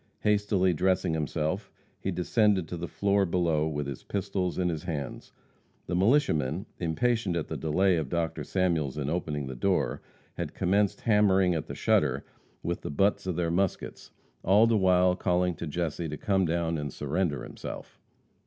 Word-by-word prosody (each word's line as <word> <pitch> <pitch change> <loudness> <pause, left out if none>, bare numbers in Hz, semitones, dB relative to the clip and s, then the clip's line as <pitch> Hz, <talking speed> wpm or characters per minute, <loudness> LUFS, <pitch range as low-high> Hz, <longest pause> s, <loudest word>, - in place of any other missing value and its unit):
Hastily 100 -3 +2
dressing 90 +1 +1
himself, 80 0 -2 0.3
he - - -3
descended 95 0 +2
to - - -4
the 85 0 -4
floor 100 +2 +1
below 85 -4 +1
with 75 -2 -2
his 70 -2 -6
pistols 95 -2 -2
in 90 - +1
his 80 -3 -3
hands. 75 -7 -5 0.5
The 90 - -2
militiamen, 95 - +2
impatient 95 +3 0
at 85 - -2
the - - -3
delay 90 +4 +2
of 75 -5 -2
Dr. 85 0 -2
Samuels 85 -7 0
in 75 0 -2
opening 75 -5 -2
the 65 - -5
door, 95 +9 0 0.4
had - - -4
commenced 100 +2 +1
hammering 95 -4 +4
at 80 -2 -3
the - - -6
shutter - - +1 0.4
with 85 +1 -2
the - - -5
butts 95 +6 +1
of 90 - -1
their 85 -1 0
muskets, 95 +1 -2 0.3
all 100 +5 +5
the 115 -1 +3
while 90 -2 +4
calling 90 -1 +1
to 85 - -5
Jesse 80 +1 -2
to 75 - -5
come 95 +1 +1
down 85 -1 0
and 75 -2 -4
surrender 75 -1 -1
himself. - - -8
90 Hz, 170 wpm, -28 LUFS, 80-95 Hz, 0.5 s, all